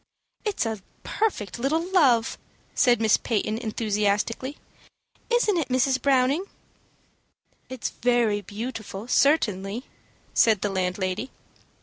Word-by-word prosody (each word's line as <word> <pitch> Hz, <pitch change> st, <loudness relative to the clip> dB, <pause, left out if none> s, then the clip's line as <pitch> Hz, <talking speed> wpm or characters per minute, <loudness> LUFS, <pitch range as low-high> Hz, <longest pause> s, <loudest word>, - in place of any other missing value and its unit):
"It's 415 Hz, -, -1 dB
a 220 Hz, -3 st, -3 dB, 0.2 s
perfect 240 Hz, -, -2 dB
little 315 Hz, +7 st, 0 dB
love," 255 Hz, -11 st, +3 dB, 0.3 s
said 245 Hz, -2 st, +4 dB
Miss 220 Hz, -1 st, +4 dB
Peyton, 215 Hz, -1 st, -1 dB
enthusiastically. 220 Hz, +4 st, -1 dB, 0.7 s
"Isn't 475 Hz, -5 st, +2 dB
it, 315 Hz, -, -1 dB
Mrs. 260 Hz, +1 st, +2 dB
Browning?" 275 Hz, +5 st, +2 dB, 1.2 s
"It 260 Hz, -2 st, -8 dB
is -, -, +1 dB
very 235 Hz, -4 st, +1 dB
beautiful, 215 Hz, 0 st, -6 dB
certainly," 235 Hz, -5 st, +1 dB, 0.5 s
said 220 Hz, -4 st, +4 dB
the 205 Hz, -, 0 dB
landlady. 185 Hz, +4 st, -2 dB
235 Hz, 105 wpm, -25 LUFS, 210-270 Hz, 1.2 s, said